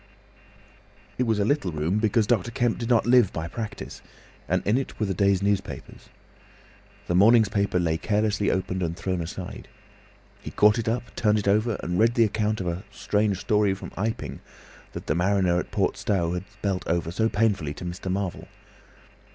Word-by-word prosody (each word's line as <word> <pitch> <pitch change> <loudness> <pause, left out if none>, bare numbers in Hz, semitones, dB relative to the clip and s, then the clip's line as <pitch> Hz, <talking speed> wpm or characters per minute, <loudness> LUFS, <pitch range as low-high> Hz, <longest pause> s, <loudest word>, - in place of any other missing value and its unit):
It 125 - +1
was 110 -2 +2
a 100 - +1
little 125 -7 0
room, 80 +6 0
because 110 0 +2
Dr. 115 -2 +1
Kemp 120 0 0
did 115 0 -3
not 120 -2 +3
live 120 -4 +5
by 80 0 -4
practice, 110 +4 -7 0.5
and - - 0
in 105 - +2
it 135 +1 -3
were 105 - +1
the 95 - -1
day's 100 0 +2
newspapers. 100 -1 -3 1.0
The - - -2
morning's 110 +3 +6
paper 100 -1 0
lay 80 -2 +1
carelessly 105 -1 +1
opened 95 0 -1
and 85 -1 -2
thrown 95 -2 -2
aside. 90 +2 -7 0.7
He - - -7
caught 105 +2 +4
it 115 - -1
up, 120 0 -3
turned 105 -1 +2
it 100 - -2
over, 105 +3 +2
and 90 +1 -1
read 115 +2 +3
the 115 - +5
account 105 0 -1
of 95 - -3
a 85 +3 -3
"Strange 105 -2 0
Story 105 -1 +1
from 95 - -9
Iping" 90 -10 -3 0.5
that - - -7
the - - 0
mariner 90 0 +2
at - - -5
Port 100 0 0
Stowe 90 -5 0
had 90 +1 -5
spelt 95 -2 -3
over 85 0 0
so 110 +5 +1
painfully 100 -10 0
to 90 - -8
Mr. 90 +2 -4
Marvel. 95 -1 -3
100 Hz, 185 wpm, -25 LUFS, 90-110 Hz, 1.0 s, morning's